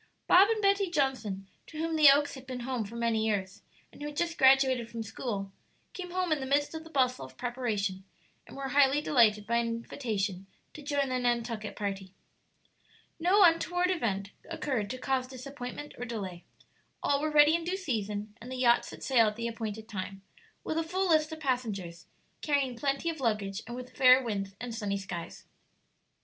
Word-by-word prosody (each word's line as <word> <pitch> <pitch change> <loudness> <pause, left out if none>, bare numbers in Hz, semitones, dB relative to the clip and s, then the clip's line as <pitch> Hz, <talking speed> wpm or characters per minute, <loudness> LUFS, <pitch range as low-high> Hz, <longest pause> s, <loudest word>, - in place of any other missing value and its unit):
Bob 385 +4 +7
and 440 -2 0
Betty 395 -1 +3
Johnson, 260 - -1 0.2
to 310 - -10
whom 325 +1 -1
the 305 -2 +8
Oaks 290 +1 +4
had 265 -1 -11
been 255 -1 -5
home 245 -2 -2
for 215 +4 -10
many 230 -2 +1
years, 200 -3 -2 0.3
and - - -15
who 295 - -3
had 295 0 -8
just 335 -1 0
graduated 265 -3 +4
from 230 -1 -5
school, 205 -3 -4 0.4
came 360 -1 -6
home 365 -1 -1
in 310 - +2
the 265 - -4
midst 285 +3 +1
of 320 0 -6
the 325 - -13
bustle 255 -4 +1
of - - -12
preparation, 225 -6 -2 0.4
and - - -11
were 275 -1 -4
highly 280 +1 +4
delighted 220 -8 +3
by 235 +2 +1
an 235 0 +1
invitation 215 -5 -3 0.3
to 305 - -9
join 285 -2 0
the 255 0 0
Nantucket 235 -3 -1
party. 195 -2 -4 1.0
No 375 +5 +5
untoward 355 +1 +3
event 200 - -2 0.2
occurred 235 -8 -2
to 255 - -4
cause 255 0 -1
disappointment 265 +2 -8
or 245 - -3
delay; 195 -7 -6 0.6
all 280 0 +2
were 310 - 0
ready 300 0 +6
in 335 0 +1
due 360 +3 -2
season, 210 - -3
and 245 +2 -9
the - - -4
yacht 240 -1 +4
set - - -10
sail 235 -5 +4
at 210 - -2
the 235 +1 -3
appointed 220 -2 -5
time, 195 -2 -6 0.4
with 315 - -1
a - - 0
full 370 +3 -1
list 310 -1 +3
of 315 - -6
passengers, 210 - -3 0.3
carrying 280 -4 +1
plenty 275 +6 -1
of 320 - -9
luggage, 210 -5 -1
and 240 - -6
with 250 0 -9
fair 255 0 +7
winds 195 -4 -3
and 240 -1 -5
sunny 205 -3 -2
skies. 190 -3 -7
250 Hz, 190 wpm, -30 LUFS, 215-290 Hz, 1.0 s, the